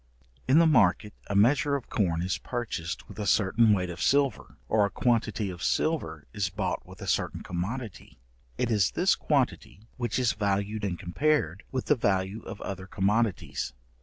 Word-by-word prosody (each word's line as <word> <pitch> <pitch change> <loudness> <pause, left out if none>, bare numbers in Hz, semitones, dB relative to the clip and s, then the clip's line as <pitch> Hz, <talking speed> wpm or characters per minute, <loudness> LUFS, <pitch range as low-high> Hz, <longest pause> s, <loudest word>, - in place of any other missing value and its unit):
In 135 +4 +5
the 170 - +7
market 105 - +3
a 100 - -2
measure 135 +7 +4
of 140 - -6
corn 85 -6 +1
is 95 - -1
purchased 110 -9 -4
with - - -11
a 105 - -2
certain 110 +3 +4
weight 90 -3 +1
of 85 - -8
silver, 140 -5 +1
or 110 -1 +3
a 100 - +2
quantity 115 -3 0
of 85 -2 -9
silver 80 - -1
is 100 -3 -1
bought 95 +1 -2
with - - -11
a - - -7
certain - - -1
commodity, 105 +5 -5 0.4
it - - 0
is 105 -4 +3
this - - +3
quantity 100 - -1 0.2
which 120 -2 -1
is 125 -3 +2
valued 100 +1 -1
and 95 -4 -1
compared 100 - 0
with 130 -1 -2
the 150 - +4
value 100 -2 0
of 100 - -8
other 95 -1 -6
commodities. 100 - 0
105 Hz, 175 wpm, -28 LUFS, 95-120 Hz, 0.4 s, the